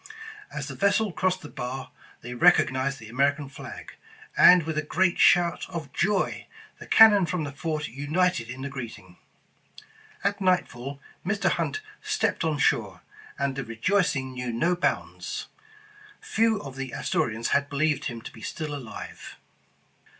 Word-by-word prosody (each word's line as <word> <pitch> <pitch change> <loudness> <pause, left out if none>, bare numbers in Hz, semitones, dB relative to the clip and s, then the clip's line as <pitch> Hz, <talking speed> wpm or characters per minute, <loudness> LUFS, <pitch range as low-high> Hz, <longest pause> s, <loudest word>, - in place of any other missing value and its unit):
As - - -5
the - - -6
vessel 200 +1 +2
crossed 185 +1 0
the 150 - -8
bar, 130 0 -6 0.3
they 120 +1 -7
recognized 130 +2 +3
the 115 - -11
American 140 +4 +1
flag, 140 - -9 0.4
and 180 -1 +8
with 160 0 -3
a 155 - +1
great 185 +4 +1
shout 175 -1 +4
of 165 -6 -6
joy, 195 +4 0 0.3
the - - -10
cannon 205 -5 +7
from 175 -1 -1
the 145 - -4
fort 155 +1 -3
united 145 0 0
in 130 +2 -6
the - - -2
greeting. 115 -9 -8 1.1
At 200 +1 0
nightfall, 140 -8 0 0.2
Mr. 200 +3 +1
Hunt 430 - -1 0.2
stepped 430 - 0
on 160 -2 0
shore, 100 - +1 0.4
and 140 -1 -1
the 135 - -3
rejoicing 130 - 0
knew 125 -1 -4
no 170 +10 +1
bounds. 175 - -2 0.7
Few 220 -1 +1
of 135 -2 -9
the 135 -2 -5
Astori 115 - 0
ans 115 +1 -2
had 140 0 +1
believed 150 +1 0
him 115 -3 -5
to - - -9
be 110 - -13
still 155 +5 -4
alive. 135 -6 -8
145 Hz, 155 wpm, -26 LUFS, 130-180 Hz, 1.1 s, and